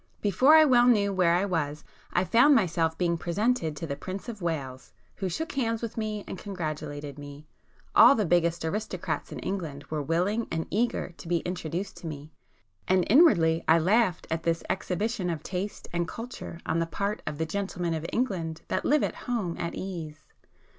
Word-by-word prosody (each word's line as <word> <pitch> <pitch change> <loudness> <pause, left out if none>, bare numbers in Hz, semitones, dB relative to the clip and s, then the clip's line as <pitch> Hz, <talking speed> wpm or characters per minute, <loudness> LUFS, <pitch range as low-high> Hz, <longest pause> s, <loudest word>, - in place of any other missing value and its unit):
Before 255 - +5
I 315 0 +8
well 245 -3 +5
knew 205 -4 +3
where 180 -3 +3
I 180 - +2
[p 200 - -2
291] 160 -5 0
was, 150 +1 -11 0.3
I 180 - +2
found 245 +9 +5
myself 165 -6 +1
being 170 -2 0
presented 175 -2 0
to 165 - -5
the 140 -3 -3
Prince 190 - -7
of 220 -4 -7
Wales, 135 - -4 0.2
who 190 - -2
shook 320 - -3
hands 230 -4 -1
with 230 -1 -4
me 215 -2 -3
and - - -7
congratulated 150 -6 -5
me;—all 145 - +2
the 215 - +1
biggest 170 -1 +2
aristocrats 210 +7 -3
in - - -6
England 160 -8 -4
were 155 -1 -1
willing 180 +9 0
and 160 0 -2
eager 230 +1 0
to - - -11
be 170 -1 +1
introduced 180 +1 -4
to 170 - -8
me;—and 145 - -4
inwardly 170 - +5
I 160 - +6
laughed 190 +2 +2
at 160 0 0
this 165 0 0
exhibition 195 +1 -2
of 160 -3 -3
taste 195 +3 -4
and 170 -1 0
culture 230 -5 -7
on 165 - 0
the 165 - 0
part 200 +5 -2
of 150 -1 -3
'the 160 - -1
gentlemen 175 -1 -2
of 160 +1 -3
England 180 -10 -2
that - - -1
live 300 +1 +3
at - - -1 0.2
home 210 -9 -1
at 170 - -3
ease. 160 -5 -6
175 Hz, 190 wpm, -27 LUFS, 160-210 Hz, 0.3 s, I